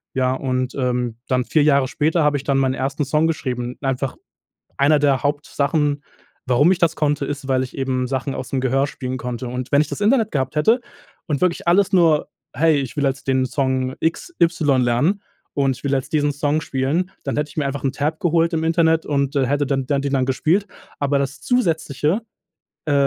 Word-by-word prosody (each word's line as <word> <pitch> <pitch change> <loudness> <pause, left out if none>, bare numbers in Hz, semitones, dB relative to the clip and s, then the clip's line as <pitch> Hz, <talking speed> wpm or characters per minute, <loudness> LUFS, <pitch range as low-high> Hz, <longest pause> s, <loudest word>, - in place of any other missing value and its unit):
ja 130 -1 +2
und, 130 -1 -2
ähm, 125 -3 -1
dann 125 -1 +1
4 155 - +2
Jahre 140 -3 +3
später 155 +4 +1
habe 145 -1 +2
ich 135 - -7
dann 140 -1 +1
meinen 130 -1 +2
1. 140 +3 -2
Song 150 +3 +2
geschrieben, 125 -6 -3
einfach 135 0 -2 0.6
einer 145 +2 +4
der 140 -4 +2
Hauptsachen, 145 0 0 0.4
warum 135 +8 +4
ich 180 - 0
das 170 -3 +2
konnte 145 -2 0
ist, 145 -1 -5
weil 130 -1 +2
ich 130 - -7
eben 130 -1 -1
Sachen 135 +1 -2
aus 130 - -5
dem 135 - -1
Gehör 135 +2 +1
spielen 130 -3 -5
konnte 125 0 -5
und 125 +1 -5
wenn 140 - +5
ich 150 - -5
das - - -5
Internet 220 +1 +3
gehabt 135 0 -2
hätte 225 +11 +3 0.5
und 145 -4 -1
wirklich 175 -1 0
alles 195 +3 +4
nur: 165 -5 +4 0.3
„Hey, 155 +2 +3
ich 135 +1 -6
will 145 - 0
jetzt 135 0 -1
den 130 -1 +2
Song 130 -1 -1
X 165 - -2
Y 155 -6 +3
lernen 145 +12 +1 0.3
und 135 -3 +1
ich - - -17
will 140 - 0
jetzt 135 +2 -1
diesen 145 -1 +2
Song 145 +2 0
spielen“, 145 +8 -1
dann - - -2
hätte 150 0 -1
ich - - -16
mir 145 - +1
einfach 140 0 -4
'n 135 - +1
Tab 150 +2 -2
geholt 170 0 +2
im 160 - 0
Internet 165 0 +2
und, 140 -1 0
äh, 135 -2 +2
hätte 145 +1 0
dann 135 -1 -1
dann 140 0 0
den 140 0 -2
dann 130 -1 +1
gespielt, 165 +9 +1 0.3
aber 145 0 +1
das 140 0 -3
zusätzliche 165 - 0 0.6
äh, 150 - +1
140 Hz, 210 wpm, -21 LUFS, 130-155 Hz, 0.6 s, wenn